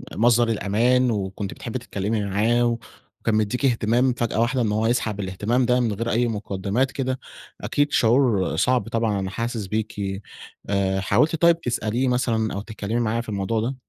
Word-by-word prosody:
مصدر 120 +2 +4
الأمان، 120 +4 +2
وكنتِ 100 -1 -3
بتحبي 120 +2 -5
تتكلّمي 105 -2 -2
معاه، 115 +4 +2 0.4
وكان 110 - 0
مديكِ 110 +6 0
إهتمام 120 +1 +2
فجأة 120 -2 -1
واحدة 125 +2 +1
إن 105 -2 +1
هو 110 +1 +1
يسحب 110 -3 0
الاهتمام 105 +6 0
ده 125 +1 +3
من 115 -4 +1
غير 115 +3 -3
أي 120 +2 +2
مقدمات 105 +4 -1
كده، 130 -1 -2 0.4
أكيد 145 0 0
شعور 115 - +3
صعب 125 +6 +1
طبعًا 115 -3 0
أنا 95 -1 -3
حاسس 115 0 -3
بيكِ. 100 -1 -3 0.5
آآ 95 -1 +1
حاولتِ 150 - +2
طيّب 170 +1 +4
تسأليه 120 0 -1
مثلًا 115 -3 0
أو 100 - -3
تتكلّمي 110 +1 -3
معاه 115 0 0
في 115 - -10
الموضوع 105 +2 -1
ده؟ 130 +4 -2
115 Hz, 170 wpm, -23 LUFS, 105-125 Hz, 0.5 s, مصدر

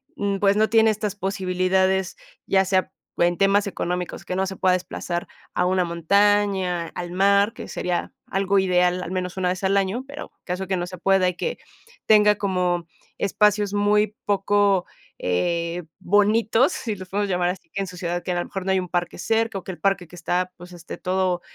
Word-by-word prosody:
mm, 200 -1 -1
pues, 200 0 +3
no 220 0 +3
tiene 225 0 +5
estas 210 -2 -2
posibilidades, 190 -1 0 0.3
ya 190 0 +3
sea 190 0 +1 0.3
en 175 0 +2
temas 200 +1 +3
económicos, 180 -2 -4
que 180 - -3
no 190 +1 +1
se 190 - -5
pueda 185 0 +2
desplazar 175 -1 -3 0.3
a 180 - +1
una 185 0 +2
montaña, 190 0 +2
al 175 -1 -5
mar, 200 +3 +3
que - - -8
sería 180 -1 -3
algo 195 +1 +1
ideal 180 -1 +2
al 175 - -6
menos 185 0 -3
una 180 -1 +1
vez 185 +1 -3
al 195 +1 +2
año, 200 +6 0
pero 285 +2 -8
caso 180 +1 -3
que 190 0 0
no 175 0 -3
se 185 0 -8
pueda 190 +1 +3
y 180 - -5
que 475 - -3 0.5
tenga 210 -1 +6
como 180 -4 0 0.3
espacios 205 0 +2
muy 210 +1 +2
poco 200 -1 +2 0.3
eh, 170 - -1 0.2
bonitos, 215 +6 +3
si 220 -4 -3
los 185 -1 -10
podemos 205 +1 -1
llamar 180 -1 +1
así, 180 -2 -6
que 195 - -4
en 195 - -3
su 180 -1 -9
ciudad, 175 -1 -3
que 185 - -3
a - - 0
lo - - -2
mejor 195 -1 -6
no 190 - +1
hay 190 - +3
un 180 -1 -5
parque 175 0 -2
cerca, 225 -2 0
o - - -15
que - - -5
el 180 - -10
parque 195 -3 0
que 175 - -14
está, 180 +1 -1
pues, 180 +1 -12
este, 170 -1 -9
todo 185 -1 0
190 Hz, 205 wpm, -23 LUFS, 180-200 Hz, 0.5 s, tenga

